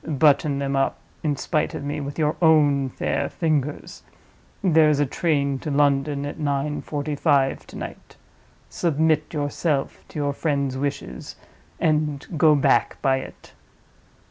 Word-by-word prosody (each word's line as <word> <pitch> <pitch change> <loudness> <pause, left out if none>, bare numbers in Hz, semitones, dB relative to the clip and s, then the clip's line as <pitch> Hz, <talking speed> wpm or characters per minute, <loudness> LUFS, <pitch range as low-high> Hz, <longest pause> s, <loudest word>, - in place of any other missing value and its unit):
Button 145 -1 +3
them 140 0 -1
up 135 0 +1 0.2
in 150 -2 0
spite 150 +2 -1
of - - -5
me 145 +1 -3
with 140 0 -6
your 155 -1 +1
own 145 -4 +4
fair - - -2
fingers. 150 -3 -2 0.6
There 160 -4 +5
is 150 -2 +2
a 145 - +3
train 140 -2 0
to 155 - -5
London 140 0 +1
at 145 - -6
nine 145 0 -1
forty 150 0 -4
five 140 -3 +1
to - - -12
night. - - -9 0.5
Submit 155 -1 +1
yourself 145 -1 -2
to - - -10
your 145 -1 0
friend's 140 -3 -1
wishes 140 +1 -4 0.4
and 150 -3 0
go 155 0 +5
back 140 - +2
by 135 -2 +3
it." 130 - -10
145 Hz, 145 wpm, -23 LUFS, 140-155 Hz, 0.6 s, There